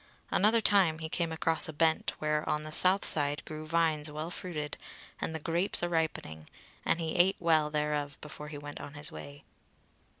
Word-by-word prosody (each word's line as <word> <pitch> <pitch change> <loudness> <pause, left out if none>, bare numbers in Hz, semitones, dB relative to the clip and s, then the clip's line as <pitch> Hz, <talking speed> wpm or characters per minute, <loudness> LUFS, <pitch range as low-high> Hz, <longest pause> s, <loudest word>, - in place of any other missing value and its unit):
Another 220 +4 +4
time 190 -7 +4
he 160 0 -4
came 170 0 -1
across 160 0 0
a - - -5
bent 160 +1 +1
where 150 0 0
on 150 0 0
the 155 - -7
south 185 +5 +5
side 145 -1 +3
grew 155 0 -7
vines 160 -2 +1
well 155 +3 -5
fruited, 155 -6 -5 0.4
and 160 - -3
the - - -3
grapes 170 +4 +1
a 175 - 0
ripening; 155 - -2 0.4
and 165 - +1
he 160 -1 -3
ate 185 +3 +4
well 160 -3 +3
thereof 150 -1 -2
before 150 0 -9
he 150 -1 -7
went 145 0 -8
on 145 - -9
his 145 +1 -5
way. 140 0 -10
155 Hz, 190 wpm, -30 LUFS, 150-170 Hz, 0.4 s, south